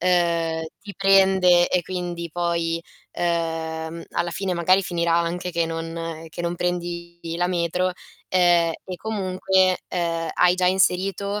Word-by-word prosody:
uhm, 170 -2 +1 0.2
ti 200 -1 -10
prende 190 -2 +5
e 180 - +1
quindi 175 -1 -5
poi, 170 -1 -1 0.3
uhm, 165 -1 -2
alla 170 0 -1
fine 190 +1 -2
magari 185 +3 +3
finirà 170 -2 0
anche 170 +1 -1
che 170 -1 0
non 165 0 -5
che 165 - -7
non 170 0 -1
prendi 175 -1 -3 0.2
la 175 +1 +1
metro, 180 +1 0 0.4
ehm, 175 -2 +4
e 185 -1 -6
comunque, 190 -2 +1
ehm, 165 -2 -2
hai 180 0 +4
già 185 0 +1
inserito 190 +2 +1
175 Hz, 135 wpm, -23 LUFS, 170-185 Hz, 0.4 s, prende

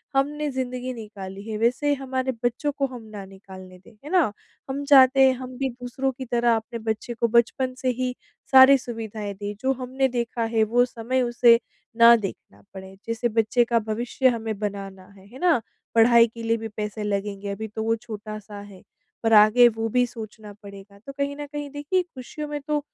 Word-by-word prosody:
हमने 295 +2 0
ज़िंदगी 255 -1 -4
निकाली 200 -3 -9
है 215 - -3
वैसे 250 +6 +1
हमारे 260 -1 -2
बच्चों 245 +5 0
को 275 - +1
हम 250 -3 -10
ना 200 -2 -7
निकालने 190 -1 -13
दें, 185 - -19
है 295 - -9
ना? 340 - +3 0.4
हम 275 +2 -3
चाहते 270 -2 +6
हैं 260 - +3
हम 255 -1 -8
भी 270 0 -1
दूसरों 250 +2 -3
की 260 +1 -8
तरह 235 -1 +2
अपने 225 +1 -5
बच्चे 220 +2 -5
को 235 0 0
बचपन 240 +3 +1
से 255 - +1
ही 250 0 -1 0.4
सारी 265 +1 +9
सुविधाएँ 220 -4 -6
दें 205 +1 -6
जो 265 +1 +1
हमने 260 +1 0
देखा 240 -2 -2
है 220 - +4
वो 240 +3 +3
समय 250 +2 -2
उसे 240 -1 +4 0.4
ना 235 0 +8
देखना 190 - -7
पड़े। 190 0 -10
जैसे 230 +1 -1
बच्चे 225 +2 +2
का 235 0 +2
भविष्य 230 +4 -1
हमें 225 -3 -3
बनाना 195 -2 -5
है 190 - -17
है 245 +6 -13
ना? 340 -9 +3 0.3
पढ़ाई 230 +1 +6
के 230 +1 -11
लिए 230 0 +1
भी 225 0 -6
पैसे 210 0 -5
लगेंगे 200 0 -3
अभी 220 +2 -5
तो 220 +1 -5
वो 225 +1 +1
छोटा-सा 215 -2 -9
है, 200 -2 -13 0.4
पर 225 - +2
आगे 215 +3 +7
वो 225 0 -2
भी 250 +2 +2
सोचना 220 -3 -10
पड़ेगा। 200 0 -12
तो 275 - -7
कहीं 280 0 -2
न 290 0 -6
कहीं 290 0 -6
देखिए 290 +6 -1
खुशियों 300 -2 -8
में 295 0 -4
तो 300 +1 -1
235 Hz, 195 wpm, -24 LUFS, 215-260 Hz, 0.4 s, सारी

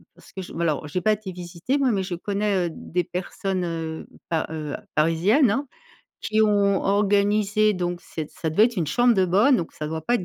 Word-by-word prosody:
parce - - -18
que, 190 - -5
j 185 - -9
alors, 155 -3 0
j'ai 180 +5 -2
pas 215 - +3
été 210 -2 -6
visiter 175 +8 -3
moi, 270 -3 +2
mais 195 -3 0
je 185 -1 -4
connais, 200 0 -1
heu, - - -3
des 180 +2 -3
personnes, 185 +2 -3
heu, 165 -1 -5 0.2
pa 165 -2 0
heu, 150 -2 -4 0.2
parisiennes, 180 - +3
hein, 275 +5 -1 0.5
qui 215 0 +1
ont 200 -2 +3
organisé 205 +1 +2
donc, 175 -1 -3
c'est 155 -2 -6
ça 160 - -4
devait 205 +8 +5
être 240 -3 -6
une 165 - 0
chambre 240 - +3
de 190 -2 +3
bonne, 210 +10 +4
donc 170 - -4
ça 150 - -5
doit 160 0 -4
pas 240 - +1
être 185 - -5
190 Hz, 215 wpm, -24 LUFS, 170-210 Hz, 0.5 s, devait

